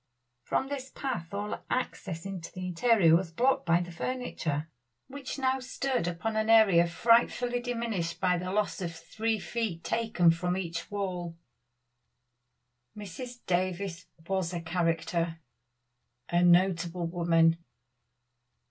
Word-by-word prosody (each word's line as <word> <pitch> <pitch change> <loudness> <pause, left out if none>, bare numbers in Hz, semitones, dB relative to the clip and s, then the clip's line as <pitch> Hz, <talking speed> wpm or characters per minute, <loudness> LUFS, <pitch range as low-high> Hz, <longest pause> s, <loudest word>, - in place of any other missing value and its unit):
From 265 - -1
this 270 -2 -5
path 240 -14 -4
all 205 +1 -4
access 190 -9 -3
into 190 -4 -6
the 185 0 -6
interior 180 -2 +4
was 175 0 +1
blocked 245 +2 +1
by 170 +1 +4
the 175 0 -6
furniture, 170 - -3 0.4
which 275 0 -7
now 265 -1 +1
stood 255 -5 -2
upon 175 +6 -2
an 220 0 0
area 195 -7 +6
frightfully 240 +5 +3
diminished 230 -8 -3
by 180 -1 +3
this 180 - -5
loss 205 +1 -1
of 170 -2 -4
three 220 +6 -2
feet 210 -5 -3
taken 220 -7 +3
from 180 +2 -1
each 170 -2 -4
wall. 180 -4 -3 1.6
Mrs. 240 +5 -8
Davies 185 0 -1 0.2
was 185 -2 -1
a 170 - -3
character 165 -1 -1 0.9
a 175 0 +3
notable 175 -1 +3
woman. 165 -1 +3
185 Hz, 125 wpm, -29 LUFS, 170-230 Hz, 1.6 s, area